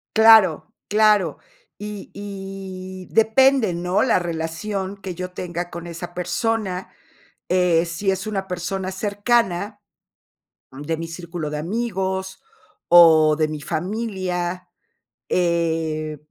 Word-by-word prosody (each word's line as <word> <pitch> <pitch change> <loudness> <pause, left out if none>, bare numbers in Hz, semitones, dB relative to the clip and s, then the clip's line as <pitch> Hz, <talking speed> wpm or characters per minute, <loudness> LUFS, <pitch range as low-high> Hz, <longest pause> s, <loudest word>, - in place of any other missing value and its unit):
Claro, 220 -7 +6 0.2
claro. 210 -1 +3 0.4
Y 210 -1 -8
y 195 -2 -8
depende, 225 -1 +4
¿no? 180 +2 0
La 235 -7 +3
relación 175 +4 -4
que 185 -2 -7
yo 180 0 -5
tenga 175 -1 -5
con 170 0 -8
esa 175 +1 -7
persona, 190 0 -2 0.6
eh, 180 -2 +3
si 170 +4 -2
es 190 +2 -1
una 195 -3 -3
persona 185 +1 -3
cercana, 205 0 0 0.9
mm, 135 +2 -9
de 160 +2 -2
mi 165 +1 -5
círculo 170 -1 -6
de 150 - -3
amigos 190 0 -3 0.5
o 160 -3 +7
de 155 -1 +2
mi 155 -1 -5
familia, 180 0 -3 0.6
eh, 160 -3 0
185 Hz, 115 wpm, -22 LUFS, 170-200 Hz, 0.9 s, o